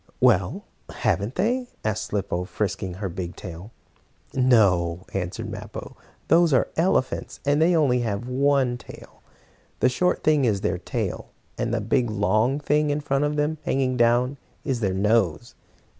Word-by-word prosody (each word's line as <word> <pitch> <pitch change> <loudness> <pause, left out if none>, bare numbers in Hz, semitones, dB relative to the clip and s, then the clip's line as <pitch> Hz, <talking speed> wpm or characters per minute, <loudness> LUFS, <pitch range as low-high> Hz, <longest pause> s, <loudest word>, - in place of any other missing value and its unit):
"Well, 105 -8 +3 0.3
haven't 105 +6 -1
they?" 245 +4 0 0.2
asked 110 -1 -1
Slicko, 95 -3 -2
frisking 95 -2 -3
her 95 +1 -4
big 90 -1 -5
tail. 90 +1 -9 0.6
"No," 95 -9 +3
answered 90 -1 -3
Mappo. - - -8 0.3
"Those 165 -1 +4
are 130 - +3
elephants, 165 -6 0
and 145 +2 +2
they 165 - +5
have 165 - +4
only 125 -3 +2
one 125 +3 +1
tail. - - -13 0.6
The - - +4
short 180 +8 0
thing 150 -2 +3
is 105 -6 +1
their 95 - -1
tail, - - -4 0.3
and 120 0 -2
the 115 +2 +1
long 110 +4 +1
thing, 150 +1 +1
in 145 +1 0
front 145 -1 0
of 145 0 -1
them, 150 +1 0
hanging 130 -1 0
down, 120 +3 +2 0.3
is 130 -4 -1
their 95 -4 0
nose." 105 +1 +1
120 Hz, 150 wpm, -24 LUFS, 100-140 Hz, 0.6 s, they